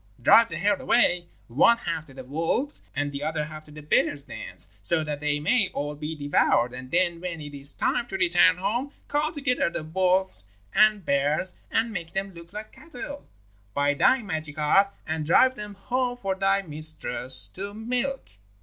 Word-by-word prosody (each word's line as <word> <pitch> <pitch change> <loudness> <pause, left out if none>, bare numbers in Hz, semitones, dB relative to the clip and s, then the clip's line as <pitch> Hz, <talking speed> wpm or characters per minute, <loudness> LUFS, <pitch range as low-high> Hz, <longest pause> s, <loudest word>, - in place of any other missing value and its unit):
Drive 225 - +6
the 170 - -5
herd 200 +3 0
away, 180 -7 +2 0.2
one 145 - +4
half 170 -6 -4
to 135 - -15
the 130 - -9
wolves' 165 - -2
and 145 +1 -2
the 140 0 -6
other 155 0 -2
half 155 0 -10
to - - -18
the 150 0 -11
bears' 145 -1 +1
dens, - - -6
so 160 +8 0
that 150 -1 -4
they 150 0 -1
may 195 +6 +2
all 145 +1 -3
be 150 +2 -6
devoured. 145 -4 +1
And 130 0 -9
then 170 0 +1
when 175 -2 -5
it 145 -1 -9
is 140 0 +1
time 240 - -1
to 195 - -4
return 180 0 +4
home 235 +9 -2
call 295 +2 0
together 275 - 0
the 170 - -4
wolves 185 - +3 0.3
and 215 -3 +3
bears 145 +6 +1
and 225 +1 0
make 170 -3 -6
them 195 0 -3
look 170 0 -13
like 210 +1 -8
cattle, 285 -2 -10 0.5
by 145 0 +2
thy 250 - +3
magic 155 -6 -5
art, 155 +7 +3 0.2
and 160 0 -3
drive 255 +11 +4
them 210 -4 -9
home 245 +5 -2
for 195 -5 -2
thy 195 +1 +1
mistress 155 -5 +3
to 200 +2 -6
milk. 250 +5 -3
175 Hz, 185 wpm, -25 LUFS, 150-210 Hz, 0.5 s, Drive